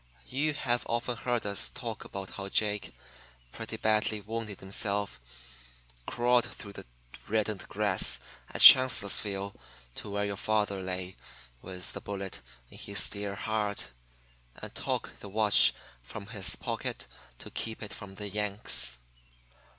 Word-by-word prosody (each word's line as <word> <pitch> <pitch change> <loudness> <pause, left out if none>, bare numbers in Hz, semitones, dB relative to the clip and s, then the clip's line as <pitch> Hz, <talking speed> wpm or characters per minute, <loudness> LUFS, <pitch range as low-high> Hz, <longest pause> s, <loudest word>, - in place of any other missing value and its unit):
You 145 +3 0
have 120 -4 +1
often 120 +1 -1
heard 120 -1 -1
us 100 -1 0
talk 115 -4 -6
about 95 -1 -7
how 100 -1 -6
Jake, 105 -1 0 0.6
pretty - - -6
badly 110 0 +2
wounded 110 -1 -5
himself, 100 - -1 0.9
crawled 120 0 +3
through 100 -2 -10
the - - -10 0.4
reddened 110 -2 -1
grass 100 -2 +2 0.3
at - - -3
Chancellorsville 100 -5 +7 0.4
to 105 - -7
where 100 0 -1
your 100 -1 -3
father 105 -2 0
lay 95 0 -4 0.4
with 90 -1 -3
the - - -6
bullet 95 -8 -5 0.3
in - - -12
his - - +1
dear 100 -1 -4
heart, 105 -1 -2 0.7
and - - -8
took - - -3
the 100 - -9
watch 105 0 +6 0.3
from 100 - -8
his 105 -5 +1
pocket - - -4 0.3
to - - -10
keep 110 0 -3
it 105 - -7
from 100 -2 -9
the 105 +1 -4
"Yanks." 100 - 0
105 Hz, 135 wpm, -30 LUFS, 100-110 Hz, 0.9 s, Chancellorsville